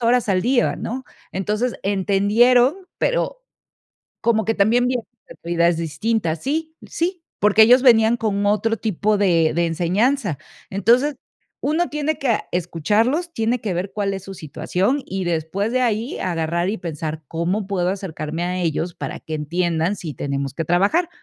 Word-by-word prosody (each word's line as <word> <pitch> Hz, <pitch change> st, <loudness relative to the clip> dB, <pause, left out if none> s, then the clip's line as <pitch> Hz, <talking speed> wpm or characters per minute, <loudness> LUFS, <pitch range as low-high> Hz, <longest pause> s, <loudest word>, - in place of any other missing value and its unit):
horas 240 Hz, 0 st, +2 dB
al 190 Hz, -2 st, +2 dB
día, 245 Hz, +1 st, +2 dB
¿no? 260 Hz, +3 st, -5 dB, 0.3 s
Entonces, 210 Hz, +6 st, -1 dB
entendieron, 205 Hz, -, +3 dB, 0.2 s
pero, -, -, 0 dB, 0.8 s
como 220 Hz, -2 st, +2 dB
que 225 Hz, -, 0 dB
también 230 Hz, +5 st, +3 dB
vie 250 Hz, 0 st, +1 dB, 0.3 s
actividades 170 Hz, 0 st, 0 dB
distintas. 165 Hz, +1 st, -1 dB
Sí, 320 Hz, +3 st, -2 dB
sí, 350 Hz, 0 st, -2 dB, 0.2 s
porque 210 Hz, +1 st, +6 dB
ellos 250 Hz, +3 st, +7 dB
venían 230 Hz, -2 st, +5 dB
con 205 Hz, -2 st, -1 dB
otro 225 Hz, +2 st, +1 dB
tipo 215 Hz, 0 st, 0 dB
de 170 Hz, -5 st, +3 dB
de 170 Hz, +1 st, +2 dB
enseñanza. 185 Hz, -, 0 dB, 0.3 s
Entonces, 240 Hz, +9 st, +2 dB, 0.5 s
uno 320 Hz, +4 st, +1 dB
tiene 300 Hz, +1 st, -1 dB
que, 275 Hz, -, -2 dB
ah, 230 Hz, -, +1 dB
escucharlos, 210 Hz, -, 0 dB
tiene 230 Hz, 0 st, 0 dB
que 205 Hz, -4 st, -2 dB
ver 185 Hz, +3 st, -3 dB
cuál 200 Hz, -2 st, -1 dB
es 195 Hz, 0 st, -7 dB
su 195 Hz, -, -8 dB
situación 185 Hz, -, -1 dB
y 190 Hz, -1 st, -3 dB
después 175 Hz, +6 st, -1 dB
de 255 Hz, +1 st, +1 dB
ahí 230 Hz, +1 st, -1 dB
agarrar 170 Hz, 0 st, -1 dB
y 220 Hz, -, -2 dB
pensar, 160 Hz, -2 st, -5 dB
¿cómo 180 Hz, +5 st, -1 dB
puedo 180 Hz, -3 st, 0 dB
acercarme 165 Hz, -4 st, -4 dB
a 180 Hz, +1 st, -1 dB
ellos 170 Hz, 0 st, -1 dB
para -, -, -6 dB
que 160 Hz, -, -6 dB
entiendan 170 Hz, +3 st, 0 dB
si 160 Hz, -4 st, -6 dB
tenemos 140 Hz, 0 st, -3 dB
que 165 Hz, -, -2 dB
trabajar?, 200 Hz, -, +2 dB
200 Hz, 160 wpm, -21 LUFS, 170-240 Hz, 0.8 s, ellos